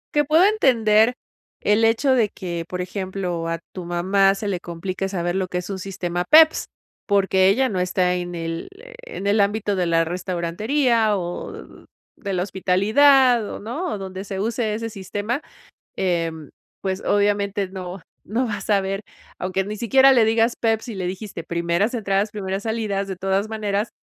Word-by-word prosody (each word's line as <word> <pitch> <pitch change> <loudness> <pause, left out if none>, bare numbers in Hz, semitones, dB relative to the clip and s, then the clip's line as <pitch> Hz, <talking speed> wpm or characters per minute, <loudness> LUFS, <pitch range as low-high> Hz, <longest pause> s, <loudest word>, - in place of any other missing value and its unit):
Que 295 - +4
puedo 315 +6 +4
entender 240 - +4 0.4
el 210 +2 +2
hecho 230 +4 +3
de 225 -5 +3
que, 170 -2 -5
por 180 - -4
ejemplo, 185 -3 -3
a 165 -1 -2
tu 185 - -6
mamá 190 +3 +2
se 205 +1 -5
le 185 -3 -2
complique 185 +3 -4
saber 175 -1 -2
lo 190 -1 -1
que 180 - -3
es 180 +2 -5
un 195 - -3
sistema 180 -2 -3
PEPS, 315 - +6 0.4
porque 195 -2 +3
ella 260 +6 +3
no 185 -5 -1
está 180 0 +1
en 175 0 -3
el, 165 - -4
eh, - - -13
en 465 - -5
el 205 +1 +3
ámbito 205 0 0
de 180 -2 0
la 165 0 +2
restaurantería 205 - 0
o 175 -1 -5 0.6
de 200 -3 -6
la 180 -1 0
hospitalidad 220 +7 +4
o, - - -6
¿no?, 295 - -4
o - - -5
donde 190 0 -6
se 195 -1 -5
use 220 0 -1
ese 230 +1 -4
sistema. 205 - -4 0.6
Em, 165 -4 -2 0.3
pues 190 0 -2
obviamente, 200 -1 +1
no 185 -1 -7 0.2
no 235 +6 -1
va 210 -3 -3
a - - -9
saber 195 -1 0 0.4
aunque 190 +1 -1
ni 210 +2 -5
siquiera 265 +3 +5
le 235 -4 +5
digas 225 +1 +2
PEPS 225 +1 0
y 225 - -5
le 185 -2 -3
dijiste 190 -1 -6
primeras 170 +7 0
entradas, 200 -2 0
primeras 195 -1 -4
salidas. 215 -3 -2
De 190 - -4
todas 195 +3 -1
maneras, 210 0 -2
195 Hz, 175 wpm, -22 LUFS, 185-225 Hz, 0.6 s, PEPS